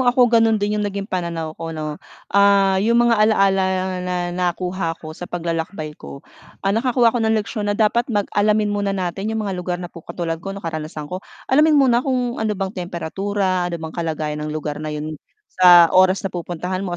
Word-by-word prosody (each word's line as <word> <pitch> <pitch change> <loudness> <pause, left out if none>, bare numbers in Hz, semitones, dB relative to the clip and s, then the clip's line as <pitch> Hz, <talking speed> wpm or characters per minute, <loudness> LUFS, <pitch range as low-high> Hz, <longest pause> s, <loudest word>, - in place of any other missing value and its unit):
ako, 245 -1 +4
gano'n 225 -1 +4
din 205 0 -1
'yung 205 - 0
naging 200 0 -4
pananaw 170 -5 -3
ko, 165 -1 -5
'no. 155 -1 -5 0.3
Ah, 200 -1 +4
'yung 230 +4 +2
mga 235 -2 +4
alaala 195 -3 +3 0.4
na 180 0 -2 0.2
nakuha 180 -1 -2
ko, 155 -1 -9
sa 175 +2 -9
paglalakbay 165 -2 -3
ko, 70 0 -10 0.4
ah, 195 - +2
nakakuha 235 +1 +3
ako 245 - 0
ng 220 0 +2
leksyon 210 0 -3
na 205 - 0
dapat 230 +3 +2
mag 205 -4 0
alamin 210 0 +2
muna 200 -1 -1
natin 190 +3 -3
'yung 220 -1 -2
mga 200 - -2
lugar 180 -1 -3
na 175 -1 -8
pu 170 - -10
katulad 165 0 -4
ko, 195 +2 -6
'no, 200 - -10
karanasan 155 -2 -5
ko, 180 +5 -6 0.3
alamin 305 +2 +5
muna 255 -4 +4
kung 250 -3 -1
ano 220 -1 0
bang 190 0 -3
temperatura, 185 +1 -2
ano 170 - -3
bang 160 -1 -7
kalagayan 155 -3 -3
ng 150 - -4
lugar 150 -1 -4
na 155 - -4
'yon 150 +1 -4 0.4
sa 175 -2 +7
oras 185 +1 +4
na 195 - -1
pupuntahan 180 +1 -4
mo, 180 -3 -3
190 Hz, 200 wpm, -20 LUFS, 170-210 Hz, 0.4 s, sa